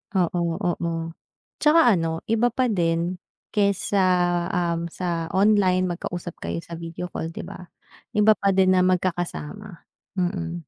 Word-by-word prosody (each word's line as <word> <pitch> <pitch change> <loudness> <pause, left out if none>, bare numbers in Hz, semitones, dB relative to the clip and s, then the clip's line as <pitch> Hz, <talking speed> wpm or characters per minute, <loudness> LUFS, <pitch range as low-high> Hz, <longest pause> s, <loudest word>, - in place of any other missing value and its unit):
Oo, 170 -2 +1
oo. 165 -1 -2 0.5
'Tsaka 315 +2 +5
ano, 165 -3 0
iba 230 +2 +3
pa 245 0 0
din, 170 -1 0 0.3
kaysa, 200 -1 +1 0.6
um, 170 -1 0
sa 170 -1 -3
online, 195 -2 +4
magkausap 175 -1 -4
kayo 170 - -4
sa 170 -1 -8
video 170 +2 -6
call, 160 - -4
'di 165 - -7
ba. 180 -1 -10 0.5
Iba 210 +1 +6
pa 195 -1 +1
din 190 -1 +4
na 185 - +4
magkakasama, 180 +1 -3 0.3
mm. 175 -2 -2
180 Hz, 135 wpm, -24 LUFS, 170-195 Hz, 0.6 s, Iba